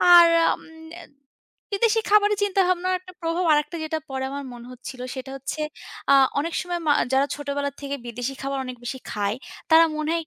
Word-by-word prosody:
আর 345 -1 +10 0.2
আম - - -3 1.1
বিদেশী 450 +2 +3
খাবারের 420 -1 +5
চিন্তাভাবনার 370 -2 +2
একটা 365 0 -14
প্রভাব 335 +2 0
আরেকটা 300 +3 0
যেটা 315 0 -2
পরে 265 0 -3
আমার 280 0 -4
মনে 240 -1 -10
হচ্ছিলো 255 0 -8
সেটা 265 0 -6
হচ্ছে 270 +3 -5 0.5
আ - - +8 0.3
অনেক 330 +3 -2
সময় 350 -1 -3
মা 290 - +6 0.2
যারা 270 +1 +4
ছোটবেলা 285 -1 -3
থেকে 280 0 -3
বিদেশী 245 +3 -4
খাবার 275 0 -2
অনেক 255 -1 -7
বেশি 260 +1 -4
খায়, 205 +2 -1 0.3
তারা 325 +1 +8
মনে 305 0 -2
হয় 335 -1 -1
295 Hz, 175 wpm, -24 LUFS, 265-355 Hz, 1.1 s, আর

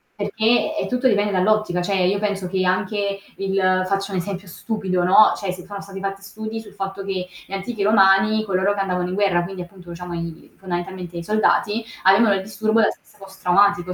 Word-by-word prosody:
perché 220 +8 +1
è - - -1
tutto 250 +1 +1
dipende 205 -2 +2
dall'ottica, 190 -1 +1
cioè 195 +2 -1
io 200 +2 +1
penso 200 -3 -2
che 185 0 -1
anche 200 +2 0 0.2
il 190 -1 +1
faccio 195 +1 -1
un 190 - -2
esempio 190 +1 -5
stupido, 185 -1 -2
no, 195 +4 +6
cioè 195 -3 -3
si 180 -1 -9
sono 200 0 -7
stati 195 0 -9
fatti 195 0 -4
studi 220 +3 -6
sul 220 - -14
fatto 195 0 -5
che 185 -2 -3 0.2
gli - - -19
antichi 200 +2 -4
romani, 205 +1 +4
coloro 195 +1 +1
che - - -4
andavano 180 -2 -1
in 185 - -3
guerra, 195 -4 +2
quindi 185 0 -6
appunto 175 -1 -15
diciamo 175 0 -7
i 170 -1 -6
fondamentalmente 175 -1 -5
i 170 - -4
soldati 215 +2 +1 0.2
avevano 200 +2 +5
il 190 - -2
disturbo 215 +2 +1
da 210 - +5
stress - - -18
post 195 0 -14
traumatico, 180 0 +3
195 Hz, 200 wpm, -21 LUFS, 185-205 Hz, 0.2 s, no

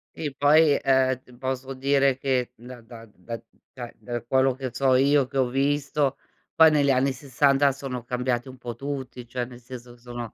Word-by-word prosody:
Sì 145 -3 -4
poi, 150 0 +4
ehm, 130 -1 +2
t 125 -1 -19
posso 130 +1 -4
dire 135 0 +2
che 130 -3 -1
da 120 +1 -12
da 115 0 -12
da 115 +6 -7
d 115 - -21 0.3
da 120 -3 -8
da 120 -1 -5
quello 130 +1 +2
che 130 -2 -5
so 130 +1 +2
io, 140 +1 +3
che 135 +1 -6
ho 130 - +3
visto, 140 +1 0 0.4
poi 160 -1 +7
negli 145 -2 +2
anni 135 +1 +2
60 140 +2 +2
sono 130 -2 -6
cambiati 125 0 -2
un 130 0 -11
po' 120 -1 -7
tutti, 130 -3 -6
cioè 125 +1 -3
nel 120 0 -12
senso 120 0 -10
che 120 - -20
sono 120 -1 -8
130 Hz, 195 wpm, -25 LUFS, 120-140 Hz, 0.4 s, poi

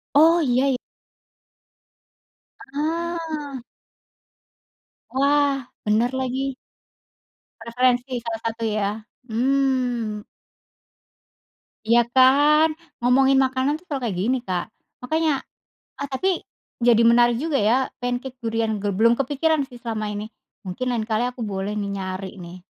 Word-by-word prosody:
Oh, 325 +3 +6
iya 260 -1 +2
y 250 - -2 2.0
Ah! 315 -2 -3 1.5
Wah! 280 0 +2 0.2
Bener 220 +3 +2
lagi. 265 +1 -2 1.1
Referensi 245 +2 +1
salah 230 -1 -4
satu, 230 0 -4
ya? 210 -2 0 0.4
Mmm. 245 -3 0 1.6
Iya 235 +1 +5
kan? 290 +4 +6 0.3
Ngomongin 265 +2 +4
makanan 260 +2 0
tuh - - -24
selalu 280 -3 -3
kayak 210 -7 -2
gini, 250 +6 +1
Kak. 180 -1 -1 0.4
Makanya 315 +4 +1 0.7
eee, 280 - -4
tapi 265 +9 0 0.5
jadi 235 -1 +5
menarik 240 0 +4
juga 310 -3 0
ya? 215 +3 +3 0.3
Pancake 245 +1 -3
durian, 225 -1 -1
ge 205 - 0
belum 230 +4 +4
kepikiran 285 +2 +1
sih, 245 - -12
selama 220 -2 -3
ini. 205 +1 -4 0.4
Mungkin 185 +8 -4
lain 230 -2 -1
kali 220 +2 +1
aku 250 0 -6
boleh 200 -1 -3
nih, 205 -1 -3
nyari 190 0 -5
nih. 175 0 -9
250 Hz, 115 wpm, -23 LUFS, 225-275 Hz, 2.0 s, Oh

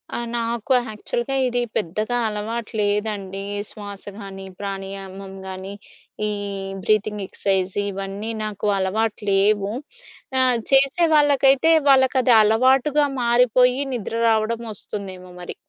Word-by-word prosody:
ఆహ్, 240 - -3
నాకు 235 +2 -1
యాక్చువల్‌గా 240 +4 -3
ఇది 245 -1 0 0.2
పెద్దగా 215 +6 -1
అలవాటు 220 +2 -4
లేదండి. 205 -2 -1 0.3
శ్వాస 205 -2 -9
గాని, 195 -2 -8
ప్రాణాయమం 195 -1 -6
గానీ, 190 +1 -7 0.5
ఈ - - -1 0.5
బ్రీతింగ్ 210 0 +1
ఎక్సర్సైజ్ 190 -1 -1
ఇవన్నీ 195 +2 -5
నాకు 210 -1 -3
అలవాటు 210 +3 -1
లేవు. 200 +1 +2 0.7
ఆహ్, 255 -2 +3
చేసే 275 +5 +5
వాళ్ళకైతే 285 +1 +4 0.2
వాళ్ళకది 260 -2 +5
అలవాటుగా 260 +7 +3 0.2
మారిపోయి 250 +2 +3
నిద్ర 230 -2 -4
రావడం 225 +1 +1
ఒస్తుందేమో 185 -3 -7
మరి. 175 - -7
215 Hz, 105 wpm, -22 LUFS, 195-245 Hz, 0.7 s, చేసే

